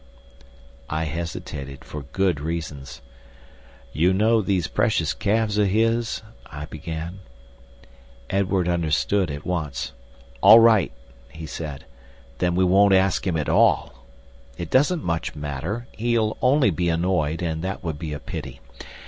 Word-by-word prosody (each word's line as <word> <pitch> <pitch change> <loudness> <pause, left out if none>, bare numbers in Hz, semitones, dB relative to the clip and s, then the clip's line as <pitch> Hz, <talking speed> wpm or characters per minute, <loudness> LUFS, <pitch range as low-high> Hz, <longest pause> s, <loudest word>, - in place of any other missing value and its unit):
I 80 +1 -1
hesitated, 75 -4 -6
for 75 - -7
good 85 +4 0
reasons. 75 -3 -5 0.9
"You 85 +4 +3
know 110 +3 +3
those 95 -4 0
precious - - +1
calves 105 0 0
of 105 - +4
his?" 115 +3 +1 0.2
I 75 0 -7
began. 80 +4 -6 1.1
Edward 95 0 0
understood 85 +2 +1
at 70 +1 -6
once. 75 -8 -3 0.5
"All 110 +3 +10
right," 115 -5 +5 0.4
he 80 0 -9
said; 75 -2 -6 0.5
"then 90 -1 +1
we 95 - +3
won't 95 +2 +5
ask 95 +1 +2
him 85 -3 +1
at 75 - -2
all. - - +3 0.6
It 85 - -6
doesn't 150 +5 +3
much 85 -2 -2
matter. 75 - -4
He'd 120 +2 0 0.2
only 130 -4 +4
be 85 +2 0
annoyed, 80 -1 0
and 80 -1 -2
that 95 +1 -4
would 80 -4 -4
be 80 -2 -5
a 75 - -4
pity. - - -7
85 Hz, 135 wpm, -23 LUFS, 80-100 Hz, 1.1 s, All